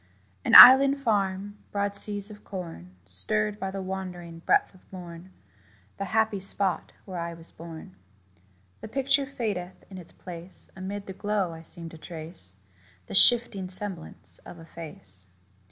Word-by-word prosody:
An - - +2
island 275 +2 +10
farm 205 -4 -2
broad 200 0 -2
seas 205 0 -1
of 210 - -14
corn 165 - -9
Stirred 210 - -2
by 195 - -4
the 195 0 -6
wandering 180 -3 -7
breath 165 - +1
of 185 - -20
morn 175 -1 -11 0.7
The 195 - -4
happy 220 +1 0
spot 190 -2 -1
where 185 -3 -7
I 170 0 -5
was 165 0 -10
born. 160 - -11 0.8
The - - -9
picture 275 +3 0
fadeth 205 -9 -5
in 190 - -9
its 170 - -14
place: 175 0 -12
Amid 195 +2 -6
the 190 - -8
glow 200 -3 -2
I 160 - -11
seem 165 +1 -11
to 160 - -14
trace 155 - -2 0.5
The - - -10
shifting 205 -3 +6
semblance 185 -3 0
of - - -13
a 165 - -13
face. 100 - -8
190 Hz, 155 wpm, -26 LUFS, 170-205 Hz, 0.8 s, island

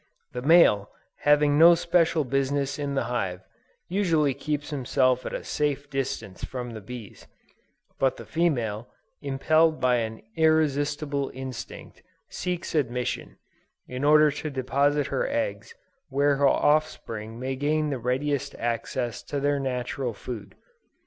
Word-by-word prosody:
The 125 - -5
male, 135 - +5 0.4
having 150 0 +5
no 170 +1 +9
special 170 -2 +2
business 140 +2 -1
in 140 -1 -2
the - - +1
hive, 95 -7 -2 0.5
usually 165 -7 +2
keeps 150 +2 -3
himself 130 -2 +1
at - - -6
a - - -5
safe 145 -1 -2
distance 125 -8 -4
from 125 -2 -5
the 110 -2 -8
bees: 115 0 -10 0.7
but 135 -1 +2
the - - -9
female, 120 -10 -1 0.3
impelled 155 +3 +2
by 125 -1 +3
an 110 -1 -4
irresistible 145 -2 +1
instinct, 130 -2 -8 0.3
seeks 180 -1 -4
admission, 125 -5 -2 0.5
in 125 +2 -5
order 150 +1 +6
to 150 +2 -5
deposit 140 +2 +1
her - - 0
eggs - - -3 0.3
where 140 0 +2
her 140 0 +4
offspring 115 -8 0
may 130 +1 -3
gain 150 +2 0
the 135 - -2
readiest 135 +3 -1
access 120 +1 -3
to 145 - -4
their 145 0 +1
natural 125 -2 -3
food. 115 -1 -8
140 Hz, 135 wpm, -26 LUFS, 125-150 Hz, 0.7 s, no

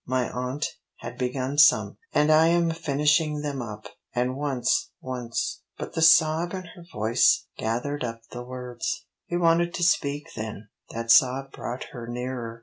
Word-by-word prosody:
My 130 -1 0
aunt 125 +4 -3 0.4
had 120 +1 -8
begun 130 +2 -1
some, 150 - +5
and 150 +1 +3
I 155 +1 +6
am 170 0 +3
finishing 150 0 +1
them 145 -3 -3
up. 105 -2 -7 0.3
And 125 +1 0
once 135 -4 0
once 125 -2 -3
" - - -52
but - - -6
the 160 - -2
sob 160 +2 +5
in 185 - -5
her 175 - -13
voice 110 +2 +3
gathered 125 +6 -2
up 115 -1 -4
the 120 - -6
words. 125 +10 -5 0.2
He 175 - -1
wanted 170 0 +2
to 175 - -2
speak 145 -4 +1
then; 110 -1 -6 0.2
that 115 0 -1
sob 135 +2 +4
brought 125 +2 -5
her 120 -3 -7
nearer. 120 -1 -5
130 Hz, 165 wpm, -26 LUFS, 120-155 Hz, 0.4 s, I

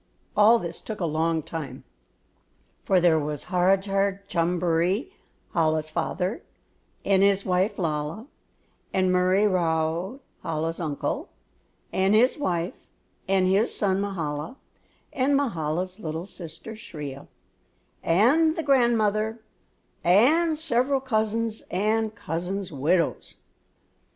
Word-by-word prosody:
All 215 +3 +6
this 170 -5 -6
took 215 -1 -6
a 175 - 0
long 160 0 0
time, 160 -3 -7 1.0
for 190 - +3
there 170 -2 +4
was 150 -1 -4
Harajar 195 +2 +2
Chumjeree, 175 - 0 0.4
Chola's 155 -2 +1
father, 180 +5 -2 0.6
and 195 -1 +3
his 200 0 +3
wife 185 +2 +1
Lalla, 160 +4 -2 0.7
and 185 -1 +2
Murree 185 +3 +3
Rao, 170 - 0 0.2
Chola's 165 +1 -2
uncle, 155 -4 -3 0.6
and 190 +2 +3
his 245 +4 +4
wife, 175 -8 -2 0.4
and 190 -1 +3
his 195 +5 +2
son 195 -1 +1
Mahala, 165 - -3 0.6
and 275 +2 +2
Mahala's 185 - -2
little 160 -1 -4
sister 175 +3 -8
Shriya, 145 -10 -8 0.7
and 280 - +3
the 325 - -2
grandmother, 225 -5 +2 0.6
and 305 - +4
several 275 -3 +1
cousins 225 -3 -1
and 215 +3 0
cousins' 185 +1 -4
widows. 160 +4 0
190 Hz, 105 wpm, -25 LUFS, 165-220 Hz, 1.0 s, All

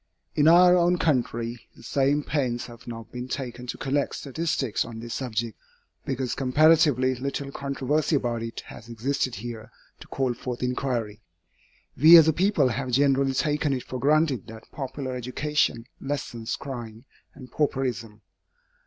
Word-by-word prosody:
In 150 0 +3
our 180 +2 +7
own 175 0 +3
country, 120 -6 -1
the - - -16
same 140 +4 +1
pains 130 -6 -1
have 120 0 -13
not 115 -1 -8
been 125 0 -6
taken 125 -2 -5
to - - -4
collect 140 +1 -1
statistics 140 -4 -2
on 115 -1 -8
this 115 0 -6
subject, 115 -4 -3 0.5
because 130 -2 -2
comparatively 145 -1 +4
little 140 +2 -4
controversy 140 +3 -1
about 120 -4 -1
it 115 0 -5
has 115 - -12
existed 130 +2 -2
here 115 +1 -7 0.3
to - - -13
call 130 -2 -1
forth 125 0 -6
inquiry. 125 -4 -2 0.7
We 160 +6 +9
as 160 -1 +7
a 160 - +4
people 175 -6 +2
have 130 +3 -3
generally 135 +1 +2
taken 150 0 +1
it 130 - -3
for 130 - -6
granted 145 - +2
that 110 -1 -12
popular 130 -1 -5
education 125 -1 -1 0.2
lessens 125 -5 -4
crime 120 -4 -8 0.3
and 130 -4 -12
pauperism. 125 -7 -2
130 Hz, 150 wpm, -26 LUFS, 120-145 Hz, 0.7 s, We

